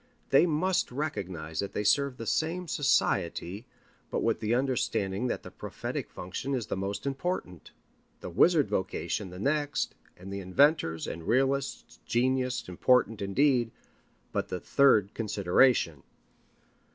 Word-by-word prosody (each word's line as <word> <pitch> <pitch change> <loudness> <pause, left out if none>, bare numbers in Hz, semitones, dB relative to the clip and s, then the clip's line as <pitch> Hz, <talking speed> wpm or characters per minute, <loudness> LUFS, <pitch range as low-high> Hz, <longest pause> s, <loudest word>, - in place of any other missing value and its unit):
They 140 +6 +6
must 175 +2 +1
recognize 95 - -4
that 100 - -2
they 105 - -1
serve 140 +4 +2
the 115 - -6
same 170 - -1
society, 120 - 0 0.4
but - - -2
with - - +1
the 110 +2 +1
understanding 125 -5 0
that - - -3
the - - -10
prophetic - - -5
function 100 +10 -4
is 120 -4 -2
the - - -3
most 100 +3 -4
important, 135 - -3 0.5
the - - -7
wizard 155 - +4
vocation 95 +1 -2
the 90 - -10
next, 145 +7 0 0.2
and 95 +2 -9
the 100 - -3
inventors' 95 - +2
and 80 0 -6
realists' 135 +2 0
genius 130 +1 0
important 115 +4 +2
indeed, 120 +4 +2 0.6
but - - -1
the 90 - -4
third 110 -4 +3
consideration. 100 - +2
120 Hz, 135 wpm, -29 LUFS, 95-140 Hz, 0.6 s, They